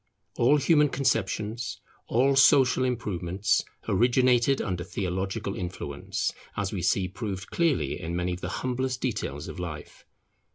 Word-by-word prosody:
All 130 Hz, +5 st, +5 dB
human 150 Hz, 0 st, +4 dB
conceptions, 115 Hz, -3 st, -1 dB, 0.3 s
all 135 Hz, +4 st, +3 dB
social 135 Hz, -1 st, +5 dB
improvements 100 Hz, -6 st, 0 dB, 0.2 s
originated 125 Hz, +4 st, +3 dB
under 90 Hz, -3 st, -2 dB
theological 95 Hz, +4 st, -3 dB
influence, 90 Hz, -1 st, -3 dB, 0.2 s
as 100 Hz, -1 st, -2 dB
we 95 Hz, -, -2 dB
see 95 Hz, +1 st, +2 dB
proved 95 Hz, 0 st, -6 dB
clearly 140 Hz, -, 0 dB
in 85 Hz, +1 st, -4 dB
many 90 Hz, +1 st, -1 dB
of 90 Hz, -, -7 dB
the -, -, -3 dB, 0.2 s
humblest 130 Hz, 0 st, -1 dB
details 90 Hz, -, -3 dB
of -, -, -7 dB
life. 75 Hz, -4 st, -7 dB
105 Hz, 130 wpm, -27 LUFS, 90-130 Hz, 0.3 s, All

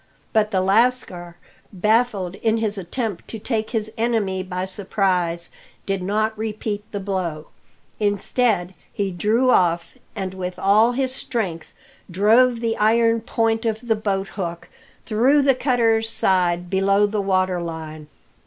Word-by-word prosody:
But 215 Hz, -2 st, +3 dB
the 190 Hz, -3 st, +1 dB
lascar, 195 Hz, -4 st, +1 dB, 0.4 s
baffled 210 Hz, -2 st, +1 dB
in 225 Hz, 0 st, +1 dB
his 215 Hz, -2 st, -1 dB
attempt 200 Hz, +1 st, -4 dB
to 225 Hz, -, -6 dB
take 220 Hz, 0 st, -2 dB
his 220 Hz, -2 st, -2 dB
enemy 220 Hz, -5 st, 0 dB
by 185 Hz, 0 st, -4 dB
surprise, 185 Hz, -4 st, -1 dB, 0.3 s
did 195 Hz, -1 st, -2 dB
not 215 Hz, +4 st, 0 dB
repeat 215 Hz, -1 st, -4 dB
the 205 Hz, -, -3 dB
blow. 180 Hz, -6 st, -3 dB, 0.5 s
Instead, 205 Hz, -2 st, 0 dB, 0.2 s
he 200 Hz, -1 st, -2 dB
drew 220 Hz, +8 st, +2 dB
off, 175 Hz, +6 st, +1 dB, 0.2 s
and 190 Hz, -3 st, -4 dB
with 180 Hz, -1 st, -5 dB
all 215 Hz, +5 st, +4 dB
his 260 Hz, 0 st, -1 dB
strength 195 Hz, -11 st, -3 dB, 0.4 s
drove 230 Hz, +6 st, +3 dB
the 225 Hz, -1 st, 0 dB
iron 230 Hz, +1 st, +3 dB
point 225 Hz, -1 st, 0 dB
of 225 Hz, +1 st, -2 dB
the 225 Hz, -, +3 dB
boathook 195 Hz, -4 st, -3 dB, 0.4 s
through 255 Hz, +6 st, +3 dB
the 270 Hz, -1 st, +5 dB
cutter's 230 Hz, -4 st, +1 dB
side 180 Hz, -4 st, +1 dB
below 195 Hz, +2 st, +3 dB
the 205 Hz, 0 st, -1 dB
water 185 Hz, -2 st, +1 dB
line. 160 Hz, -2 st, -7 dB
205 Hz, 135 wpm, -22 LUFS, 185-225 Hz, 0.5 s, the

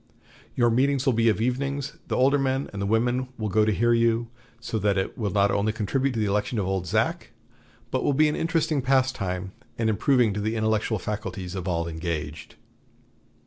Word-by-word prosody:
Your 120 Hz, -1 st, +3 dB
meetings 135 Hz, +3 st, +2 dB
will 130 Hz, -, +3 dB
be 115 Hz, 0 st, +3 dB
of 110 Hz, -, +1 dB
evenings; 140 Hz, +5 st, -2 dB
the -, -, -1 dB
older 140 Hz, +3 st, +3 dB
men, 135 Hz, 0 st, -1 dB
and 100 Hz, -, -5 dB
the 100 Hz, -, -1 dB
women, 120 Hz, +4 st, +1 dB
will 110 Hz, -2 st, -2 dB
go 105 Hz, +3 st, +3 dB
to 110 Hz, -, +2 dB
hear 120 Hz, +3 st, +2 dB
you; 115 Hz, 0 st, +2 dB, 0.3 s
so 115 Hz, -1 st, -3 dB
that 100 Hz, -1 st, +1 dB
it 95 Hz, -, -2 dB
will 105 Hz, -3 st, -2 dB
not 100 Hz, 0 st, +2 dB
only 100 Hz, +2 st, +1 dB
contribute 125 Hz, +5 st, -1 dB
to 115 Hz, -, -2 dB
the 110 Hz, -, +1 dB
election 105 Hz, +4 st, -1 dB
of 100 Hz, -, 0 dB
'Old 95 Hz, -1 st, -2 dB
Zach,' -, -, 0 dB, 0.6 s
but -, -, 0 dB
will -, -, +2 dB
be 155 Hz, +3 st, +4 dB
an 150 Hz, -, 0 dB
interesting 165 Hz, -3 st, 0 dB
pastime, 125 Hz, -9 st, 0 dB, 0.3 s
and 110 Hz, -1 st, +1 dB
improving 120 Hz, 0 st, +2 dB
to 105 Hz, -, -3 dB
the 110 Hz, +2 st, -1 dB
intellectual 110 Hz, 0 st, 0 dB
faculties 100 Hz, -2 st, -5 dB
of 95 Hz, -2 st, -5 dB
all 85 Hz, -2 st, -1 dB
engaged." 80 Hz, -2 st, -5 dB
110 Hz, 200 wpm, -25 LUFS, 100-130 Hz, 0.6 s, be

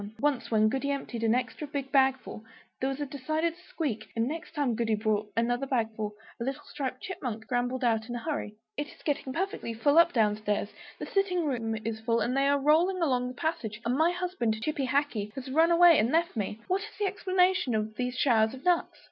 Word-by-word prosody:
Once 290 Hz, -3 st, 0 dB
when 215 Hz, -1 st, +4 dB
Goody 270 Hz, +5 st, -1 dB
emptied 260 Hz, -4 st, -3 dB
an 225 Hz, +1 st, +3 dB
extra 255 Hz, +4 st, -3 dB
big 280 Hz, -2 st, -4 dB
bagful, 265 Hz, -5 st, +2 dB, 0.4 s
there 265 Hz, -, 0 dB
was 270 Hz, +1 st, -4 dB
a 290 Hz, -, -1 dB
decided 310 Hz, +5 st, -1 dB, 0.2 s
squeak; 275 Hz, -10 st, -3 dB
and 230 Hz, +1 st, +1 dB
next 320 Hz, +2 st, -6 dB
time 285 Hz, -5 st, +1 dB
Goody 225 Hz, -1 st, +1 dB
brought 210 Hz, -1 st, -1 dB
another 245 Hz, +3 st, +1 dB
bagful, 220 Hz, -4 st, -1 dB, 0.2 s
a -, -, -2 dB
little 270 Hz, +2 st, -3 dB
striped 260 Hz, -2 st, -5 dB
Chipmunk 245 Hz, -, -4 dB
scrambled 245 Hz, +2 st, -1 dB
out 225 Hz, -2 st, +1 dB
in 240 Hz, -, -3 dB
a 240 Hz, -, -5 dB
hurry. 290 Hz, -9 st, -3 dB, 0.2 s
"It 290 Hz, 0 st, -3 dB
is -, -, -16 dB
getting 285 Hz, -3 st, -1 dB
perfectly 330 Hz, -, -3 dB
full 285 Hz, +7 st, +4 dB
up 340 Hz, 0 st, +6 dB
down 210 Hz, -5 st, +2 dB
stairs; 210 Hz, -1 st, -1 dB, 0.3 s
the -, -, -5 dB
sitting 365 Hz, -4 st, +1 dB
room 230 Hz, -6 st, -1 dB
is 225 Hz, -1 st, -2 dB
full, 230 Hz, +1 st, +1 dB
and 240 Hz, +4 st, 0 dB
they 275 Hz, 0 st, +3 dB
are 285 Hz, 0 st, +4 dB
rolling 320 Hz, +7 st, +3 dB
along 255 Hz, -7 st, +1 dB
the 250 Hz, -, -6 dB
passage; 240 Hz, -9 st, -3 dB
and 240 Hz, +2 st, +1 dB
my 320 Hz, +4 st, +4 dB
husband, 355 Hz, -12 st, -1 dB
Chippy 285 Hz, -2 st, -1 dB
Hackee, 255 Hz, -7 st, 0 dB
has 265 Hz, 0 st, -6 dB
run 325 Hz, +4 st, +4 dB
away 340 Hz, -1 st, +7 dB
and 225 Hz, +4 st, +2 dB
left 335 Hz, -1 st, +1 dB
me. 210 Hz, 0 st, -3 dB
What 375 Hz, +2 st, +1 dB
is 430 Hz, 0 st, -9 dB
the 420 Hz, -, 0 dB
explanation 370 Hz, -, +2 dB
of 215 Hz, 0 st, -2 dB
these 250 Hz, +2 st, -2 dB
showers 225 Hz, -3 st, +3 dB
of 265 Hz, -, -13 dB
nuts?" 355 Hz, -2 st, +2 dB
260 Hz, 215 wpm, -29 LUFS, 225-310 Hz, 0.4 s, away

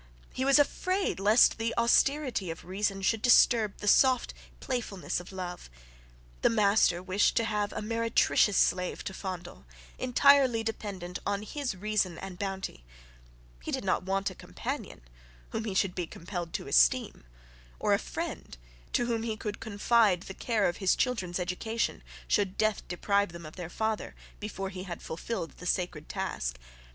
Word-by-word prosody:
He 260 Hz, -, -1 dB
was 275 Hz, +1 st, +6 dB
afraid 370 Hz, -, +1 dB
lest 215 Hz, +4 st, +5 dB
the 225 Hz, +1 st, -1 dB
austerity 235 Hz, -, +2 dB
of 165 Hz, -, -7 dB
reason 195 Hz, +1 st, -2 dB
should 220 Hz, +2 st, +1 dB
disturb 230 Hz, -3 st, +5 dB
the 210 Hz, -, -6 dB
soft 255 Hz, +3 st, +4 dB, 0.3 s
playfulness 235 Hz, -10 st, -3 dB
of 175 Hz, -, -11 dB
love. 180 Hz, -, -6 dB, 0.7 s
The -, -, +4 dB
master 200 Hz, -5 st, +3 dB
wished 190 Hz, +2 st, +2 dB
to 230 Hz, -, +3 dB
have 210 Hz, -2 st, -1 dB
a -, -, -4 dB
meretricious 230 Hz, -2 st, +2 dB
slave 180 Hz, 0 st, +1 dB
to 190 Hz, -, -5 dB
fondle, 180 Hz, -, -7 dB, 0.3 s
entirely 255 Hz, -2 st, +4 dB
dependent 195 Hz, -5 st, -5 dB
on 200 Hz, 0 st, -1 dB
his 275 Hz, -1 st, -3 dB
reason 205 Hz, -3 st, 0 dB
and 190 Hz, -2 st, -8 dB
bounty; 195 Hz, -, -4 dB, 0.8 s
he -, -, -7 dB
did -, -, -2 dB
not -, -, +1 dB
want 195 Hz, +1 st, -1 dB
a -, -, -9 dB
companion, -, -, -6 dB, 0.5 s
whom 220 Hz, 0 st, -3 dB
he 200 Hz, -4 st, -3 dB
should 190 Hz, -1 st, +2 dB
be 180 Hz, -2 st, -3 dB
compelled 175 Hz, 0 st, -6 dB
to -, -, -4 dB
esteem, -, -, +3 dB, 0.6 s
or -, -, +2 dB
a -, -, +3 dB
friend -, -, -6 dB, 0.4 s
to 240 Hz, -, +2 dB
whom 230 Hz, -2 st, -1 dB
he 225 Hz, -1 st, -3 dB
could 210 Hz, -1 st, -5 dB
confide 215 Hz, -3 st, +2 dB
the 190 Hz, -, -8 dB
care 220 Hz, -1 st, +1 dB
of 175 Hz, -, -2 dB
his 190 Hz, -2 st, +2 dB
children's 190 Hz, -9 st, -1 dB
education, 185 Hz, +6 st, -2 dB, 0.3 s
should 200 Hz, -3 st, +1 dB
death 215 Hz, -1 st, +1 dB
deprive 200 Hz, +1 st, 0 dB
them 170 Hz, -1 st, -9 dB
of 155 Hz, -, -10 dB
their 175 Hz, -3 st, -6 dB
father, 220 Hz, +3 st, -2 dB, 0.2 s
before 195 Hz, -2 st, -4 dB
he 185 Hz, -1 st, -7 dB
had 180 Hz, -2 st, -6 dB
fulfilled 165 Hz, -1 st, -4 dB
the 180 Hz, -, -7 dB
sacred 175 Hz, -4 st, -2 dB
task. -, -, -3 dB
200 Hz, 165 wpm, -29 LUFS, 180-225 Hz, 0.8 s, was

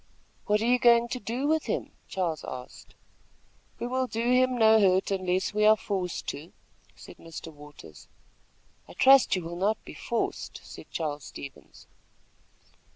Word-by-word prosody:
"What 210 Hz, 0 st, +2 dB
are -, -, 0 dB
you 250 Hz, +1 st, +3 dB
going 235 Hz, -1 st, +5 dB
to 250 Hz, -, -3 dB
do 240 Hz, +5 st, -3 dB
with 315 Hz, +1 st, +1 dB
him?" -, -, -3 dB, 0.2 s
Charles 170 Hz, -5 st, -2 dB
asked. 125 Hz, -1 st, -9 dB, 0.8 s
"We -, -, -4 dB
will 255 Hz, +1 st, -1 dB
do 235 Hz, +1 st, -1 dB
him 255 Hz, 0 st, +3 dB
no 220 Hz, -1 st, +6 dB
hurt 190 Hz, -1 st, +3 dB
unless 185 Hz, 0 st, -1 dB
we 210 Hz, 0 st, +1 dB
are 215 Hz, +1 st, +6 dB
forced 190 Hz, -5 st, -3 dB
to," 155 Hz, +5 st, -7 dB, 0.4 s
said -, -, -13 dB
Mr. 165 Hz, 0 st, -10 dB
Waters. 145 Hz, -, -14 dB, 0.8 s
"I -, -, -12 dB
trust 270 Hz, -4 st, +6 dB
you 185 Hz, -, -3 dB
will 170 Hz, +1 st, -6 dB
not 205 Hz, +4 st, +1 dB
be -, -, -9 dB
forced," 235 Hz, -, -3 dB
said -, -, -12 dB
Charles 150 Hz, -3 st, -4 dB
Stevens. 140 Hz, -1 st, -11 dB
210 Hz, 155 wpm, -27 LUFS, 170-240 Hz, 0.8 s, no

